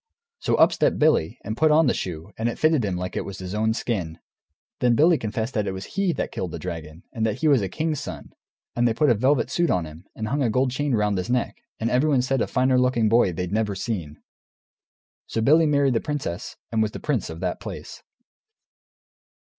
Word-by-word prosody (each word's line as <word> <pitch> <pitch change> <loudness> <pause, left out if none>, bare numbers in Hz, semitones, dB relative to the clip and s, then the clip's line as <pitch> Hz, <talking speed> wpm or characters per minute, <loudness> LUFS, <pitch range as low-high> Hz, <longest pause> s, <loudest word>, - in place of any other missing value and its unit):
So - - +1
up - - +5
stepped - - +1
Billy, 150 - +2
and 110 +2 -4
put 155 +5 +3
on 155 +2 +5
the 125 - +3
shoe, 85 +1 -5
and 115 +1 -1
it - - -5
fitted 155 -5 +3
him 95 -3 -1
like 90 +1 -4
his 95 -1 -5
own 110 +1 +1
skin. 90 -10 -3 0.6
Then 120 -1 +3
Billy 160 +4 +4
confessed 110 +3 -3
that 105 -2 -1
it 95 - -2
was 95 0 -8
he 195 -2 +1
that - - -3
killed - - -3
the - - -6
dragon. 80 +1 -7
And 115 -3 -2
that 110 -1 -1
he 160 - +3
was 140 -6 +5
a 95 - -2
king's 155 -2 -2
son. 145 - -8 0.4
And 120 0 +3
they 115 - 0
put 145 +2 +3
a - - +6
velvet 130 +3 +1
suit 175 +3 +1
on 90 -2 +1
him, 80 +4 -12
and 110 - -4
hung 140 +2 0
a 125 - +2
gold 130 +3 +1
chain 140 0 0
round 105 -2 +1
his 90 - -4
neck, 125 -1 0 0.2
and 115 +2 -1
everyone 130 0 +3
said 135 +1 0
a - - +1
finer 130 0 +2
looking 125 -4 +2
boy 115 -4 +4
they'd 90 +2 -4
never 105 -2 0
seen. 90 -8 -4 1.1
So - - -2
Billy 155 +8 +5
married 140 -3 +3
the 115 - +1
princess, 135 - -4
and 110 -1 +1
was 110 -1 0
the - - -6
prince 135 -9 -1
of 80 0 -7
that 90 -1 -2
place. - - -8
115 Hz, 225 wpm, -24 LUFS, 100-135 Hz, 1.1 s, a